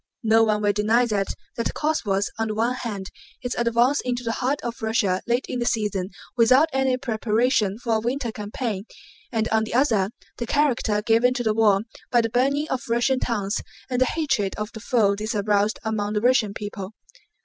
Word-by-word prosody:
No 225 0 +5
one 215 -1 +1
will 205 0 +3
deny 220 +4 +3
that 205 -4 0 0.3
that 230 - -2
cause 310 +1 0
was, 195 -1 0
on 225 - 0
the 215 - -3
one 230 +3 +1
hand, 210 -6 -5 0.3
its 245 - -2
advance 240 +4 +2
into 245 -1 -2
the 230 - -1
heart 260 +5 -1
of 235 0 -5
Russia 215 -4 +1
late 240 +2 +1
in 250 - -3
the 240 - -1
season 205 -4 -1 0.3
without 255 +6 +5
any 265 -1 +2
preparation 225 -3 +1
for 230 -2 0
a - - 0
winter 240 +1 -2
campaign 210 -1 -4 0.5
and, 225 -2 0
on 220 0 +2
the 220 - -4
other, 225 -8 +3 0.3
the 235 - -4
character 240 -8 +1
given 235 +3 +3
to 245 - -1
the 220 -2 +2
war 210 -3 +4 0.3
by 240 - +4
the 230 -1 -2
burning 280 +5 +1
of 255 -2 -3
Russian 240 +3 +2
towns 210 -5 -1 0.3
and 250 0 0
the - - +6
hatred 255 - 0
of 210 +1 -4
the 220 - -9
foe 220 -3 +2
this 215 +2 -3
aroused 205 +1 +1
among 210 -1 -1
the 210 - 0
Russian 230 -4 +2
people. 205 -1 -6
225 Hz, 200 wpm, -24 LUFS, 210-245 Hz, 0.5 s, the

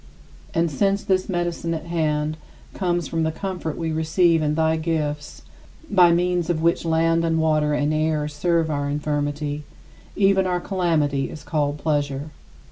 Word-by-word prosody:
And 165 -1 +2
since 195 +7 +1
this 185 +1 0
medicine 175 -2 -1
at 160 - -6
hand 155 -2 0 0.4
comes 175 -4 -1
from 165 +4 -2
the 160 0 +1
comfort 175 -2 -4
we 165 -1 -2
receive 160 +1 +2
in 150 0 0
thy 160 0 +2
gifts 155 -2 -3 0.5
(by 180 -4 +6
means 175 0 +1
of 170 -2 +1
which 170 +1 +2
land 165 0 +2
and 165 -1 +1
water 155 -2 +2
and 145 +1 +1
air 155 -1 0
serve 160 +2 0
our 145 -1 -1
infirmity), 145 0 -2 0.5
even 195 -1 +3
our 180 -1 0
calamity 160 -8 0
is 155 - -9
called 145 -2 -1
pleasure. 145 -1 -1
160 Hz, 155 wpm, -23 LUFS, 150-175 Hz, 0.5 s, by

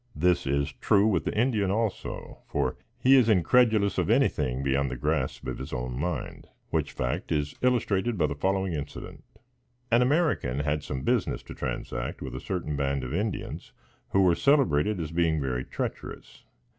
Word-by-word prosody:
This 90 -1 +2
is 70 +1 0
true 100 0 +3
with 110 -3 +1
the - - -2
Indian 110 -5 +2
also; 110 +1 -3
for, - - -1 0.2
he 135 +1 +5
is 125 -4 +5
incredulous 110 0 +3
of - - 0
anything 75 - +2
beyond 70 0 +1
the 65 - -4
grasp - - -1
of 65 - -4
his 65 - -7
own 60 0 -3
mind; 85 +7 -4 0.2
which - - 0
fact 60 -1 -3
is 75 -2 0
illustrated 120 -3 +1
by 80 - +3
the 70 - -1
following 95 +4 0
incident. 75 -1 -7 0.7
An 120 +1 +5
American 125 - +1
had 75 0 0
some 65 -2 -4
business - - 0
to - - -9
transact - - -4
with - - -6
a - - -4
certain 85 -5 -3
band 70 -1 -1
of 65 - -5
Indians, 100 +4 -3 0.4
who 95 - +3
were 90 -2 +5
celebrated 105 - +3
as 80 -2 -4
being 85 -2 +1
very 65 -2 -2
treacherous. - - -6
85 Hz, 170 wpm, -27 LUFS, 70-110 Hz, 0.7 s, he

